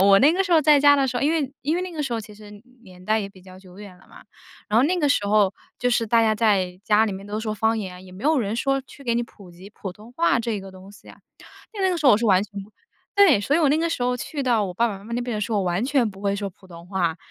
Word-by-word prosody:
我 195 Hz, 0 st, +6 dB
那 295 Hz, +3 st, +5 dB
个 385 Hz, +3 st, +1 dB
时 365 Hz, -, -1 dB
候 320 Hz, -2 st, +5 dB
在 300 Hz, 0 st, +5 dB
家 285 Hz, +1 st, +6 dB
的 275 Hz, -2 st, +1 dB
时 250 Hz, -, -3 dB
候， -, -, -1 dB
因 300 Hz, -, +2 dB
为 290 Hz, -5 st, -1 dB
因 300 Hz, +4 st, 0 dB
为 355 Hz, -, -1 dB
那 365 Hz, -, -5 dB
个 325 Hz, -3 st, -6 dB
时 260 Hz, -, -4 dB
候 230 Hz, -, -1 dB
其 215 Hz, 0 st, -12 dB
实 210 Hz, 0 st, -14 dB, 0.2 s
年 185 Hz, -2 st, -15 dB
代 215 Hz, +3 st, +1 dB
也 200 Hz, -2 st, -4 dB
比 190 Hz, -2 st, -18 dB
较 185 Hz, 0 st, -14 dB
久 185 Hz, 0 st, -16 dB
远 200 Hz, -3 st, -11 dB
了 -, -, -22 dB
嘛。 -, -, -15 dB, 0.5 s
然 215 Hz, -, +3 dB
后 250 Hz, -, +4 dB
那 365 Hz, +4 st, 0 dB
个 295 Hz, -5 st, +1 dB
时 205 Hz, -7 st, +1 dB
候 205 Hz, -2 st, +3 dB, 0.2 s
就 245 Hz, +1 st, 0 dB
是 235 Hz, -1 st, +1 dB
大 230 Hz, +1 st, +3 dB
家 220 Hz, -1 st, +2 dB
在 195 Hz, -5 st, +1 dB
家 215 Hz, +1 st, +4 dB
里 220 Hz, -, -2 dB
面 195 Hz, +1 st, -8 dB
都 210 Hz, +1 st, -4 dB
说 220 Hz, -1 st, -3 dB
方 220 Hz, +2 st, 0 dB
言， 185 Hz, -3 st, -7 dB
也 185 Hz, -, -14 dB
没 185 Hz, +3 st, -12 dB
有 305 Hz, +1 st, +3 dB
人 215 Hz, -3 st, -2 dB
说 270 Hz, +3 st, 0 dB
去 275 Hz, +1 st, -16 dB
给 235 Hz, -3 st, 0 dB
你 240 Hz, -, 0 dB
普 200 Hz, -5 st, -16 dB
及 180 Hz, +4 st, -14 dB
普 195 Hz, -3 st, -8 dB
通 215 Hz, +5 st, -16 dB
话 330 Hz, -2 st, +2 dB
这 230 Hz, -3 st, -3 dB
个 195 Hz, 0 st, -10 dB
东 190 Hz, +1 st, -14 dB
西 205 Hz, -, -17 dB
啊。 -, -, -14 dB, 0.5 s
因 420 Hz, -, -7 dB
为 380 Hz, -, +2 dB
那 -, -, +1 dB
个 355 Hz, -, -1 dB
时 300 Hz, -, 0 dB
候 260 Hz, -, +8 dB
我 -, -, +5 dB
是 235 Hz, -, -2 dB
完 190 Hz, -2 st, +4 dB
全 200 Hz, -1 st, -8 dB
不 200 Hz, -, -16 dB, 0.5 s
对， 380 Hz, -, +6 dB
所 270 Hz, +8 st, 0 dB
以 -, -, +2 dB
我 305 Hz, -, +3 dB
那 290 Hz, -, +3 dB
个 335 Hz, +1 st, 0 dB
时 270 Hz, -, -2 dB
候 250 Hz, 0 st, 0 dB
去 285 Hz, +3 st, -5 dB
到 235 Hz, -5 st, +1 dB
我 185 Hz, -, -5 dB
爸 235 Hz, +6 st, +1 dB
爸 205 Hz, -, -5 dB
妈 195 Hz, -, -16 dB
妈 230 Hz, -, -9 dB
那 240 Hz, -, -1 dB
边 240 Hz, -1 st, -4 dB
的 210 Hz, -, -3 dB
时 220 Hz, -, -3 dB
候， 210 Hz, -, +1 dB
我 195 Hz, -, -1 dB
完 180 Hz, +5 st, -1 dB
全 260 Hz, -3 st, +1 dB
不 190 Hz, -1 st, -14 dB
会 200 Hz, -1 st, 0 dB
说 200 Hz, 0 st, -3 dB
普 190 Hz, +1 st, -21 dB
通 170 Hz, -1 st, -13 dB
话， 180 Hz, -4 st, -1 dB
220 Hz, 365 characters per minute, -23 LUFS, 195-270 Hz, 0.5 s, 候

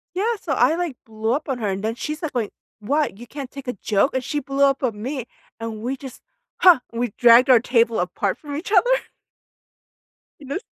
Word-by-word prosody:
Yeah, 445 Hz, +5 st, 0 dB
so 305 Hz, -, -3 dB
I, 265 Hz, +3 st, +3 dB
like, 340 Hz, -7 st, -3 dB
blew 220 Hz, +1 st, -2 dB
up 295 Hz, +2 st, -2 dB
on 260 Hz, -2 st, -1 dB
her, 210 Hz, -3 st, -2 dB
and 195 Hz, +1 st, -3 dB
then 225 Hz, +1 st, -1 dB
she's 305 Hz, +6 st, -5 dB
like, 315 Hz, -, -3 dB
going, 235 Hz, -5 st, -2 dB, 0.3 s
"What? 280 Hz, -1 st, 0 dB
You 240 Hz, -, -10 dB
can't 275 Hz, +1 st, -7 dB
take 275 Hz, -2 st, -10 dB
a 245 Hz, -, -1 dB
joke?" 205 Hz, +6 st, +1 dB
And 260 Hz, -1 st, -1 dB
she 295 Hz, -, -2 dB
blew 275 Hz, 0 st, +1 dB
up 275 Hz, 0 st, +2 dB
on 225 Hz, -5 st, -1 dB
me, 255 Hz, +1 st, -4 dB, 0.3 s
and 225 Hz, -1 st, -5 dB
we 260 Hz, +3 st, -2 dB
just 260 Hz, -2 st, -10 dB, 0.4 s
Ha! 355 Hz, -7 st, +8 dB
We 235 Hz, -2 st, -2 dB
dragged 240 Hz, +2 st, +7 dB
our 245 Hz, -3 st, +7 dB
table 230 Hz, -2 st, +2 dB
apart 185 Hz, +2 st, -1 dB
from 290 Hz, -2 st, -8 dB
each 320 Hz, +7 st, -5 dB
other. 435 Hz, +4 st, +4 dB, 1.5 s
You 280 Hz, -, -12 dB
know 285 Hz, +7 st, -2 dB
255 Hz, 220 wpm, -22 LUFS, 230-290 Hz, 1.5 s, Ha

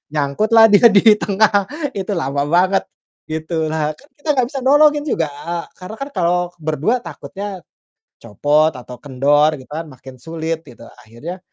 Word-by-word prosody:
Nyangkutlah 215 Hz, +11 st, +4 dB
dia 220 Hz, +3 st, +7 dB
di 210 Hz, +2 st, +6 dB
tengah, 205 Hz, -1 st, +2 dB, 0.3 s
itu 195 Hz, +1 st, -4 dB
lama 140 Hz, -1 st, -1 dB
banget, 185 Hz, +3 st, +3 dB, 0.5 s
gitulah. 155 Hz, -1 st, -2 dB
Kan 280 Hz, -, -21 dB
kita 300 Hz, +1 st, -8 dB
enggak 250 Hz, -2 st, +1 dB
bisa 275 Hz, -, -4 dB
nolongin 295 Hz, +1 st, +4 dB
juga, 165 Hz, -, -1 dB, 0.5 s
karena 180 Hz, +4 st, -9 dB
kan 275 Hz, +1 st, -5 dB
kalau 175 Hz, -1 st, +1 dB, 0.2 s
ber-2 155 Hz, -, 0 dB
takutnya 185 Hz, +5 st, -8 dB, 0.6 s
copot 145 Hz, +8 st, +1 dB
atau 125 Hz, 0 st, -10 dB
kendor 145 Hz, +3 st, +2 dB
gitu 130 Hz, -, -14 dB
kan, 160 Hz, +2 st, -5 dB
makin 130 Hz, 0 st, -13 dB
sulit, 160 Hz, +1 st, -4 dB
gitu. -, -, -14 dB, 0.2 s
Akhirnya, 145 Hz, +12 st, -9 dB
165 Hz, 145 wpm, -18 LUFS, 145-205 Hz, 0.6 s, dia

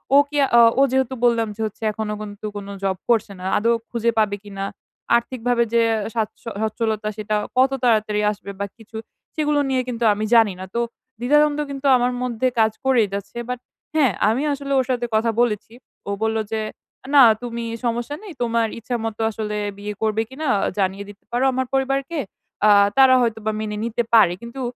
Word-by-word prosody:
ও -, -, +9 dB
কি 295 Hz, -, -3 dB, 0.2 s
অ -, -, +9 dB, 0.2 s
ও -, -, +6 dB
যেহেতু 265 Hz, 0 st, +1 dB
বললাম 230 Hz, -2 st, +3 dB
যে 225 Hz, -, -7 dB
হচ্ছে 215 Hz, +1 st, -7 dB
এখনো 210 Hz, 0 st, -4 dB
কিন্তু 205 Hz, 0 st, -8 dB
কোনো 200 Hz, -1 st, -6 dB
জব 190 Hz, -1 st, 0 dB
করছে 220 Hz, -3 st, +2 dB
না 180 Hz, -, -8 dB
আদৌ 230 Hz, +3 st, +2 dB, 0.2 s
খুঁজে 235 Hz, 0 st, 0 dB
পাবে 210 Hz, -2 st, +2 dB
কিনা? 195 Hz, -1 st, -6 dB, 0.5 s
আর্থিকভাবে 240 Hz, 0 st, 0 dB
যে 235 Hz, -, +4 dB, 0.2 s
আ 210 Hz, -, -4 dB
সাচ্ছ 220 Hz, -2 st, -2 dB, 0.2 s
সচ্ছলতা 220 Hz, -1 st, -1 dB
সেটা 215 Hz, 0 st, -2 dB, 0.2 s
কত 260 Hz, +1 st, +5 dB
তাড়াতাড়ি 215 Hz, -3 st, +2 dB
আসবে 200 Hz, -1 st, -8 dB
বা 200 Hz, -, -1 dB
কিছু? 225 Hz, 0 st, -11 dB, 0.4 s
সেগুলো 300 Hz, -1 st, +1 dB
নিয়ে 260 Hz, -1 st, +1 dB
কিন্তু 240 Hz, -1 st, -3 dB
আমি 210 Hz, +1 st, -2 dB
জানিনা। 200 Hz, -5 st, +3 dB
তো, 235 Hz, -, +2 dB, 0.4 s
দ্বিধা-দ্বন্দ্ব 295 Hz, +4 st, +3 dB
কিন্তু 275 Hz, 0 st, -7 dB
আমার 245 Hz, 0 st, +1 dB
মধ্যে 250 Hz, 0 st, 0 dB
কাজ 220 Hz, 0 st, +4 dB
করেই 250 Hz, -5 st, +4 dB
যাচ্ছে 200 Hz, +3 st, -6 dB
বাট, 250 Hz, -1 st, -3 dB, 0.4 s
হ্যাঁ 280 Hz, -7 st, +4 dB, 0.2 s
আমি 240 Hz, +6 st, 0 dB
আসলে 280 Hz, 0 st, -5 dB
ওর 260 Hz, -, +1 dB
সাথে 245 Hz, -2 st, 0 dB
কথা 225 Hz, +1 st, +2 dB
বলেছি, 225 Hz, -2 st, -1 dB, 0.4 s
ও -, -, -1 dB
বললো 220 Hz, 0 st, +1 dB
যে, 220 Hz, -1 st, -1 dB, 0.4 s
"আ -, -, -10 dB
না 280 Hz, -, +9 dB, 0.2 s
তুমি 235 Hz, -1 st, -4 dB, 0.2 s
সমস্যা 240 Hz, +4 st, -2 dB
নেই 400 Hz, -5 st, -9 dB
তোমার 230 Hz, -1 st, +1 dB
ইচ্ছামতো 225 Hz, -1 st, -4 dB
আসলে 210 Hz, -1 st, -4 dB, 0.2 s
বিয়ে 205 Hz, +1 st, -5 dB
করবে 220 Hz, 0 st, +1 dB
কিনা 295 Hz, +4 st, -5 dB, 0.3 s
জানিয়ে 195 Hz, +1 st, -1 dB
দিতে 205 Hz, 0 st, -14 dB
পারো 240 Hz, +2 st, 0 dB
আমার 260 Hz, +1 st, 0 dB
পরিবারকে, 270 Hz, +4 st, 0 dB, 0.5 s
আ -, -, +6 dB, 0.3 s
তারা 265 Hz, -1 st, +7 dB
হয়তোবা 220 Hz, -2 st, -1 dB
মেনে 210 Hz, -1 st, -4 dB
নিতে 235 Hz, +1 st, -1 dB
পারে" 215 Hz, -6 st, +6 dB
কিন্তু, 235 Hz, +3 st, -8 dB
230 Hz, 185 wpm, -22 LUFS, 215-255 Hz, 0.5 s, ও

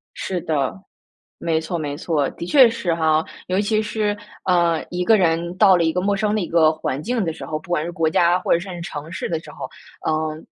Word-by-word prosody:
是 180 Hz, -3 st, -3 dB
的， 140 Hz, -5 st, -1 dB, 0.6 s
没 165 Hz, -1 st, 0 dB
错 160 Hz, +2 st, -3 dB
没 145 Hz, -3 st, -3 dB
错， 155 Hz, -5 st, 0 dB
的 -, -, -7 dB
确 255 Hz, +5 st, +6 dB
是 190 Hz, -7 st, -1 dB
哈。 160 Hz, -1 st, +2 dB, 0.2 s
尤 185 Hz, +1 st, 0 dB
其 215 Hz, +1 st, +1 dB
是， 210 Hz, -1 st, -1 dB, 0.3 s
呃， 170 Hz, -3 st, +2 dB
一 180 Hz, 0 st, -2 dB
个 220 Hz, +3 st, +5 dB
人 170 Hz, 0 st, +1 dB
到 195 Hz, -2 st, +6 dB
了 170 Hz, -, +2 dB
一 160 Hz, -, +2 dB
个 180 Hz, -, 0 dB
陌 200 Hz, +2 st, +1 dB
生 210 Hz, +1 st, 0 dB
的 210 Hz, -, 0 dB
一 175 Hz, -, -3 dB
个 160 Hz, -2 st, +4 dB
环 155 Hz, -3 st, -3 dB
境 230 Hz, +3 st, -1 dB
的 165 Hz, -, -2 dB
时 165 Hz, -, -8 dB
候， 155 Hz, -, -3 dB
不 165 Hz, -, -18 dB
管 175 Hz, -3 st, +1 dB
是 170 Hz, -, -4 dB
国 160 Hz, -1 st, 0 dB
家 175 Hz, +2 st, +3 dB
或 -, -, -3 dB
者 170 Hz, -, +3 dB
甚 190 Hz, +2 st, -8 dB
至 -, -, -6 dB
是 170 Hz, -, -7 dB
城 155 Hz, -1 st, -7 dB
市 -, -, -4 dB
的 165 Hz, -, -1 dB
时 -, -, -12 dB
候， -, -, -7 dB, 0.4 s
呃， 155 Hz, 0 st, -1 dB
170 Hz, 270 characters per minute, -21 LUFS, 160-190 Hz, 0.6 s, 确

